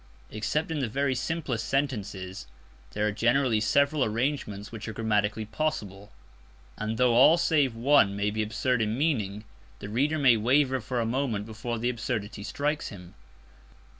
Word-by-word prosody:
Except 150 Hz, +10 st, -2 dB
in 155 Hz, -, -1 dB
the 130 Hz, -5 st, -1 dB
very 140 Hz, +3 st, 0 dB
simplest 130 Hz, -4 st, -3 dB
sentences 100 Hz, -, -3 dB, 0.5 s
there 105 Hz, 0 st, 0 dB
are 105 Hz, -, +1 dB
generally 120 Hz, +1 st, +2 dB
several 140 Hz, +6 st, +2 dB
arrangements 110 Hz, -3 st, -2 dB
which 115 Hz, -1 st, -7 dB
are 110 Hz, -, -4 dB
grammatically 105 Hz, -1 st, 0 dB
possible; 105 Hz, -6 st, -4 dB, 0.6 s
and, 110 Hz, +1 st, -3 dB
though 125 Hz, -1 st, +3 dB
all 135 Hz, +8 st, +7 dB
save 145 Hz, -8 st, +2 dB
one 115 Hz, -5 st, +4 dB
may 100 Hz, +1 st, 0 dB
be 110 Hz, +1 st, -1 dB
absurd 110 Hz, +3 st, 0 dB
in 110 Hz, +1 st, 0 dB
meaning, 110 Hz, -9 st, -1 dB, 0.3 s
the 100 Hz, -, -8 dB
reader 140 Hz, +8 st, +1 dB
may 130 Hz, -6 st, +5 dB
waver 130 Hz, +3 st, +2 dB
for 125 Hz, +3 st, -3 dB
a 115 Hz, -, 0 dB
moment 115 Hz, -4 st, -1 dB
before 115 Hz, +2 st, -5 dB
the 120 Hz, +2 st, 0 dB
absurdity 110 Hz, -3 st, -4 dB
strikes 145 Hz, +8 st, -2 dB
him. 90 Hz, -4 st, -11 dB
115 Hz, 160 wpm, -27 LUFS, 105-135 Hz, 0.6 s, all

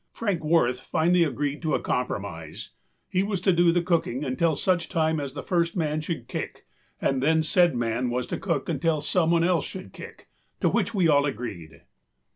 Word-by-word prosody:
Frank 200 Hz, -8 st, -2 dB
Wirth 150 Hz, -6 st, +2 dB
finally 170 Hz, +2 st, +2 dB
agreed 145 Hz, 0 st, -2 dB
to 160 Hz, -3 st, 0 dB
a -, -, 0 dB
compromise: 95 Hz, -10 st, -4 dB, 0.4 s
he 185 Hz, -, 0 dB
was 200 Hz, -1 st, -1 dB
to 190 Hz, 0 st, +3 dB
do 170 Hz, 0 st, +4 dB
the 175 Hz, 0 st, +1 dB
cooking 165 Hz, -6 st, 0 dB
until 155 Hz, +5 st, +1 dB
such 180 Hz, 0 st, 0 dB
time 160 Hz, -1 st, +1 dB
as 140 Hz, -1 st, -5 dB
the 140 Hz, -, -5 dB
first 170 Hz, -2 st, 0 dB
man 155 Hz, -3 st, -1 dB
should 160 Hz, +1 st, -5 dB
kick -, -, -6 dB, 0.3 s
and 135 Hz, -1 st, 0 dB
then 160 Hz, +3 st, +3 dB
said 170 Hz, -1 st, +3 dB
man 120 Hz, +1 st, -1 dB
was 125 Hz, 0 st, -1 dB
to -, -, -4 dB
cook 165 Hz, -8 st, -2 dB
until 165 Hz, -3 st, 0 dB
someone 165 Hz, +2 st, +2 dB
else 175 Hz, -1 st, +2 dB
should 185 Hz, 0 st, -8 dB
kick, -, -, -11 dB, 0.3 s
to -, -, +2 dB
which 230 Hz, -, 0 dB
we 185 Hz, -4 st, +3 dB
all 145 Hz, -2 st, +4 dB
agreed. 100 Hz, -, -6 dB
160 Hz, 190 wpm, -26 LUFS, 130-170 Hz, 0.4 s, do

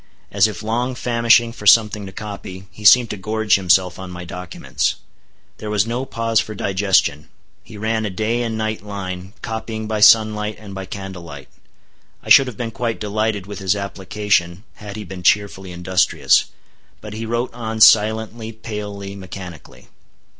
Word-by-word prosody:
As 100 Hz, +1 st, +4 dB
if 105 Hz, -4 st, -7 dB
long 120 Hz, +4 st, -1 dB
famishing 120 Hz, -1 st, +3 dB
for 105 Hz, -3 st, -6 dB
something 105 Hz, -2 st, +5 dB
to -, -, -9 dB
copy, 95 Hz, -2 st, -8 dB
he 105 Hz, -, -13 dB
seemed 120 Hz, +3 st, +6 dB
to 105 Hz, -, -5 dB
gorge 110 Hz, +2 st, -1 dB
himself 90 Hz, -1 st, +2 dB
on 95 Hz, -1 st, -7 dB
my 90 Hz, 0 st, -8 dB
documents. 90 Hz, 0 st, -3 dB, 0.6 s
There 105 Hz, -, -6 dB
was 105 Hz, -1 st, +1 dB
no 120 Hz, +3 st, -3 dB
pause 115 Hz, -2 st, 0 dB
for 110 Hz, -, -4 dB
digestion. 95 Hz, -6 st, +1 dB, 0.3 s
He 110 Hz, -, -12 dB
ran 110 Hz, +1 st, -1 dB
a 105 Hz, -, -2 dB
day 110 Hz, +5 st, -1 dB
and 115 Hz, -2 st, -2 dB
night 110 Hz, -1 st, -3 dB
line, 95 Hz, -2 st, -6 dB
copying 110 Hz, -1 st, -5 dB
by 110 Hz, -1 st, -2 dB
sun 110 Hz, 0 st, +6 dB
light 105 Hz, 0 st, -4 dB
and 100 Hz, -1 st, -11 dB
by 95 Hz, 0 st, -6 dB
candle 95 Hz, -2 st, -7 dB
light. 75 Hz, -6 st, -11 dB, 0.7 s
I -, -, -9 dB
should 135 Hz, -, +8 dB
have 120 Hz, -5 st, -7 dB
been 115 Hz, -2 st, -4 dB
quite 115 Hz, 0 st, -3 dB
delighted 105 Hz, -1 st, -2 dB
with 105 Hz, +1 st, -8 dB
his 95 Hz, 0 st, +1 dB
application, 100 Hz, -2 st, -1 dB
had 105 Hz, -1 st, -9 dB
he 110 Hz, -, -6 dB
been 95 Hz, -1 st, -9 dB
cheerfully 95 Hz, 0 st, +1 dB
industrious. 90 Hz, +1 st, +2 dB, 0.5 s
But 105 Hz, -1 st, -9 dB
he 110 Hz, +1 st, -5 dB
wrote 120 Hz, +2 st, -2 dB
on 110 Hz, -2 st, -5 dB
silently, 110 Hz, +1 st, +4 dB
palely, 105 Hz, -3 st, -7 dB
mechanically. 90 Hz, -4 st, -10 dB
105 Hz, 170 wpm, -20 LUFS, 95-110 Hz, 0.7 s, should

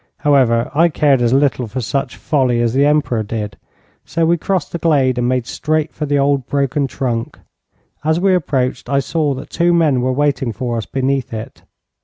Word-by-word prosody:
However, 125 Hz, -5 st, +3 dB
I 165 Hz, +4 st, +4 dB
cared 145 Hz, -4 st, +2 dB
as 120 Hz, -1 st, +2 dB
little 135 Hz, -2 st, +2 dB
for 115 Hz, +5 st, -5 dB
such 135 Hz, +3 st, -2 dB
folly 130 Hz, -6 st, +1 dB
as 120 Hz, -1 st, +1 dB
the 140 Hz, +2 st, +3 dB
Emperor 145 Hz, -6 st, +1 dB
did, 105 Hz, -1 st, -4 dB, 0.5 s
so 165 Hz, -1 st, -1 dB
we 170 Hz, +1 st, +3 dB
crossed 180 Hz, 0 st, -2 dB
the 170 Hz, -, -4 dB
glade 135 Hz, -7 st, +2 dB
and 120 Hz, 0 st, +1 dB
made 125 Hz, -2 st, 0 dB
straight 155 Hz, +3 st, -2 dB
for 150 Hz, -, -4 dB
the 145 Hz, 0 st, +1 dB
old 140 Hz, -2 st, +1 dB
broken 140 Hz, 0 st, 0 dB
trunk. 120 Hz, -3 st, -3 dB, 0.7 s
As 160 Hz, +2 st, +1 dB
we 190 Hz, +1 st, +3 dB
approached, 130 Hz, -8 st, -1 dB
I 140 Hz, 0 st, +2 dB
saw 145 Hz, +2 st, -1 dB
that 130 Hz, -, -9 dB
two 170 Hz, 0 st, +2 dB
men 150 Hz, -7 st, +2 dB
were 130 Hz, +1 st, 0 dB
waiting 135 Hz, -3 st, 0 dB
for 120 Hz, +3 st, -3 dB
us 110 Hz, -, -4 dB
beneath 135 Hz, -1 st, -1 dB
it. 110 Hz, -, -8 dB
135 Hz, 195 wpm, -17 LUFS, 125-150 Hz, 0.7 s, I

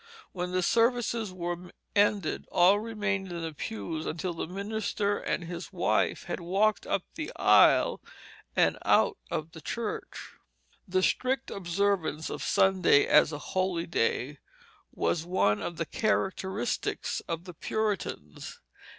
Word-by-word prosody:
When 180 Hz, -1 st, -4 dB
the 185 Hz, 0 st, +1 dB
services 230 Hz, 0 st, +2 dB
were 175 Hz, 0 st, -5 dB, 0.2 s
ended, 205 Hz, -4 st, +2 dB
all 185 Hz, +4 st, +5 dB
remained 210 Hz, -4 st, -2 dB
in 170 Hz, -1 st, -4 dB
the 160 Hz, -1 st, -4 dB
pews 140 Hz, +4 st, -5 dB
until 170 Hz, +2 st, -3 dB
the 165 Hz, -, -4 dB
minister 205 Hz, +2 st, -2 dB
and -, -, -2 dB
his 170 Hz, +2 st, -7 dB
wife 180 Hz, -3 st, +1 dB
had 175 Hz, -, -4 dB
walked 195 Hz, +5 st, +1 dB
up 190 Hz, -, 0 dB
the 315 Hz, -1 st, -5 dB
aisle -, -, +5 dB, 0.5 s
and -, -, +3 dB
out 450 Hz, -5 st, +3 dB
of 155 Hz, +1 st, -3 dB
the 160 Hz, -, -11 dB
church. 230 Hz, +3 st, -5 dB, 0.6 s
The 185 Hz, 0 st, +1 dB
strict 265 Hz, +5 st, 0 dB
observance 180 Hz, -4 st, -1 dB
of -, -, -5 dB
Sunday 185 Hz, -6 st, +4 dB
as 150 Hz, +1 st, +5 dB
a 150 Hz, -, -4 dB, 0.2 s
holy 185 Hz, -3 st, 0 dB
day 140 Hz, -1 st, -1 dB, 0.5 s
was 160 Hz, -, 0 dB
one 165 Hz, -, +1 dB
of 170 Hz, -, -4 dB
the 165 Hz, -, -1 dB
characteristics 200 Hz, 0 st, -1 dB
of 165 Hz, 0 st, -3 dB
the 180 Hz, -1 st, -9 dB
Puritans. 215 Hz, +5 st, -3 dB
185 Hz, 135 wpm, -29 LUFS, 170-205 Hz, 0.6 s, all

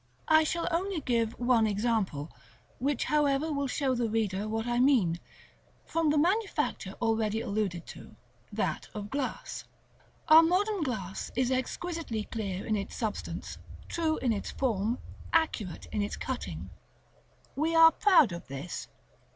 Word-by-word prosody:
§ -, -, -40 dB
XX. 125 Hz, -, -1 dB
I 315 Hz, -, +7 dB
shall 335 Hz, +2 st, -1 dB
only 365 Hz, +1 st, 0 dB
give 230 Hz, -4 st, +1 dB
one 240 Hz, -2 st, +3 dB
example, 205 Hz, -8 st, -1 dB, 0.5 s
which 275 Hz, +1 st, 0 dB
however 295 Hz, 0 st, +2 dB
will 280 Hz, -1 st, -1 dB
show 265 Hz, 0 st, 0 dB
the 240 Hz, -2 st, 0 dB
reader 210 Hz, -2 st, -1 dB
what 225 Hz, +1 st, -2 dB
I 240 Hz, 0 st, 0 dB
mean, 230 Hz, -11 st, +3 dB, 0.7 s
from 330 Hz, -2 st, +1 dB
the 300 Hz, -, +3 dB
manufacture 360 Hz, -, 0 dB
already 225 Hz, -2 st, +1 dB
alluded 200 Hz, -6 st, -2 dB
to, -, -, -11 dB, 0.4 s
that -, -, -2 dB
of 210 Hz, 0 st, -6 dB
glass. 275 Hz, -2 st, -4 dB, 0.6 s
Our 315 Hz, +1 st, +10 dB
modern 380 Hz, +4 st, +2 dB
glass 205 Hz, -, -3 dB
is 255 Hz, +1 st, +1 dB
exquisitely 260 Hz, -2 st, -2 dB
clear 200 Hz, -4 st, -4 dB
in 215 Hz, -, +1 dB
its 200 Hz, -1 st, -4 dB
substance, 220 Hz, -3 st, -4 dB, 0.3 s
true 320 Hz, -2 st, 0 dB
in 245 Hz, -3 st, +1 dB
its 200 Hz, -, -4 dB
form, 230 Hz, -2 st, 0 dB, 0.4 s
accurate 280 Hz, -, 0 dB
in 210 Hz, -, 0 dB
its 205 Hz, -, -2 dB
cutting. 260 Hz, -2 st, -5 dB, 0.8 s
We 320 Hz, +3 st, 0 dB
are 325 Hz, 0 st, +9 dB
proud 350 Hz, -, +5 dB
of 170 Hz, 0 st, -7 dB
this. 140 Hz, +5 st, -6 dB
240 Hz, 150 wpm, -30 LUFS, 210-310 Hz, 0.8 s, Our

